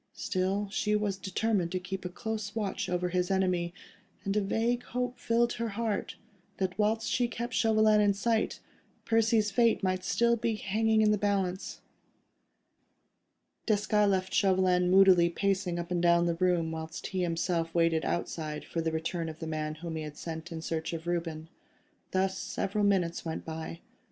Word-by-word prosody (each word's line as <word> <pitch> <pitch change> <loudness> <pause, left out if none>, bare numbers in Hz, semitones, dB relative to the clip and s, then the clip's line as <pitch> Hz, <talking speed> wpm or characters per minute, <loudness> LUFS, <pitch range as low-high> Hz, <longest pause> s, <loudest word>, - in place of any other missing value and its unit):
Still, 195 +2 -1
she 210 0 +1
was 210 -2 0
determined 190 -2 -1
to 185 - 0
keep 185 +1 -6
a - - -2
close 215 +2 -5
watch 205 -4 -2
over 180 0 0
his 180 +1 0
enemy, 185 -3 +1 0.5
and 200 +1 -1
a 210 - +3
vague 230 +4 0
hope 250 0 -3
filled 235 +1 +2
her 230 -1 -3
heart, 225 -3 -2 0.4
that 185 -1 -1
whilst 220 +2 +1
she 245 -1 +1
kept 235 +1 -5
Chauvelin 215 -1 +4
in 205 -1 +3
sight, 220 +2 0 0.4
Percy's 225 -2 +3
fate 230 0 +3
might 185 -1 0
still 235 0 +2
be 230 -1 -1
hanging 220 +2 +2
in 210 - +4
the 210 - +1
balance. 195 -2 -1 1.9
Desgas 215 -1 0
had 210 -1 +4
left 190 -1 0
Chauvelin 185 -2 +3
moodily 185 -2 +6
pacing 190 -1 0
up 170 +1 -5
and 175 -1 +1
down 170 0 +4
the 170 - +1
room, 170 -2 +1
whilst 160 0 -6
he 190 -1 -2
himself 165 -1 -1
waited 165 -1 +3
outside 155 -3 -3
for 165 - -3
the 160 0 -1
return 165 +1 -2
of 155 - -8
the 165 - -6
man 155 -1 -3
whom 165 +1 -6
he 160 - -3
had 150 -1 -7
sent 165 +1 -6
in 160 -1 -5
search 160 0 -3
of 165 0 -5
Reuben. 165 -2 -3 0.6
Thus 190 0 0
several 205 +2 -2
minutes 180 -4 +1
went 160 -1 -5
by. 160 +1 -6
190 Hz, 175 wpm, -30 LUFS, 170-210 Hz, 1.9 s, moodily